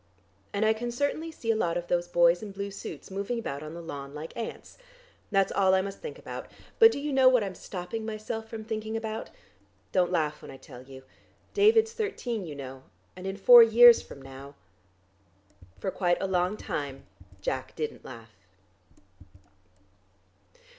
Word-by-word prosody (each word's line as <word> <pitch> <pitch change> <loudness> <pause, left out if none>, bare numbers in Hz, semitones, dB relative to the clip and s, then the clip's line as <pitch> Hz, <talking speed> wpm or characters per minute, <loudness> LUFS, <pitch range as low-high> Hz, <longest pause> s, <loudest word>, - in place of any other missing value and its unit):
"And 205 +2 0
I 220 - +4 0.2
certainly 285 +6 -2
can 320 - -14
see 230 - 0
a - - +1
lot 175 -6 0
of 175 - -4
those 175 0 0
boys 175 0 +4
in 215 - -6
blue 200 0 -5
suits, 195 - -8
moving 200 +5 -3
about 140 -11 -4
on 155 +1 -8
the 170 - -8
lawn 140 -3 -7
like 155 +2 -8
ants. 230 - -7 0.5
That's 195 -2 +2
all 190 -1 +3
I 190 - +2
must 195 0 -6
think 470 - -7
about. - - -8 0.3
But 450 0 +9
do - - -4
you 290 0 -3
know 265 -1 +6
what 250 -4 +3
I'm 195 -2 -4
stopping 185 +5 -6
myself 220 0 -5
from 220 -1 -6
thinking 220 0 -4
about? 220 0 -5 0.6
Don't 180 -1 +2
laugh 150 -4 -1
when - - -11
I 135 - -9
tell 125 - -12
you. 130 0 -13 0.5
David's 445 +2 +4
thirteen, 250 - -3
you 150 - -7
know, 135 -1 -8 0.3
and 185 +1 -7
in 195 0 -4
four 240 +4 +9
years 235 +1 +8
from 140 - -12
now 135 +1 -11 0.6
" 95 -1 -27
For 190 - -2
quite 175 -2 +1
a - - -1
long 185 +2 0
time 140 -7 -5 0.3
Jack 130 +6 -4
didn't 155 -1 -4
laugh.... 115 -3 -11
195 Hz, 180 wpm, -28 LUFS, 150-225 Hz, 0.6 s, But